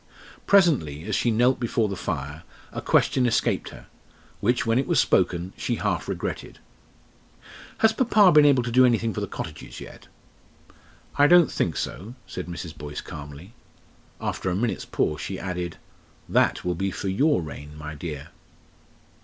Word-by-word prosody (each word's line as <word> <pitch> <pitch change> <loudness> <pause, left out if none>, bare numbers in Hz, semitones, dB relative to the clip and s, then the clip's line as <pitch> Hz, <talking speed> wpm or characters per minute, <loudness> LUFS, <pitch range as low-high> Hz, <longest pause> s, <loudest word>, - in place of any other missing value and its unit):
Presently, 135 - +3
as 105 +1 -2
she 120 - +1
knelt 120 +3 +3
before 115 -2 0
the 100 - -4
fire, 75 -3 -4 0.3
a - - -5
question 130 -2 +2
escaped 115 - 0
her, - - -13 0.5
which, 120 +4 +1
when 115 +2 +2
it 135 - -1
was 170 -6 +3
spoken, 90 -2 +1
she 120 - -2
half 95 -8 -2
regretted. - - -5 1.2
"Has 220 0 +4
papa 215 -5 +5
been 150 -2 +7
able 135 -4 +4
to 120 - -3
do 130 +2 +6
anything 115 -2 +2
for 105 - -4
the 100 - -2
cottages 80 -4 -7
yet?" - - -12 1.1
"I 145 - +7
don't 175 0 +6
think 80 -6 -1
so," 110 +7 -5
said 90 - -6
Mrs. 85 -2 -7
Boyce, 75 0 -7
calmly. 75 +7 -10 0.7
After 95 - -2
a 90 - -1
minute's 115 +3 -1
pause 75 - -1
she - - -4
added, 90 -2 -4 0.5
"That - - +2
will 90 - +1
be 95 +3 -2
for 95 - -5
your 110 - +2
reign, 75 0 -9
my 75 +1 -7
dear." 75 -2 -7
100 Hz, 160 wpm, -25 LUFS, 80-125 Hz, 1.2 s, been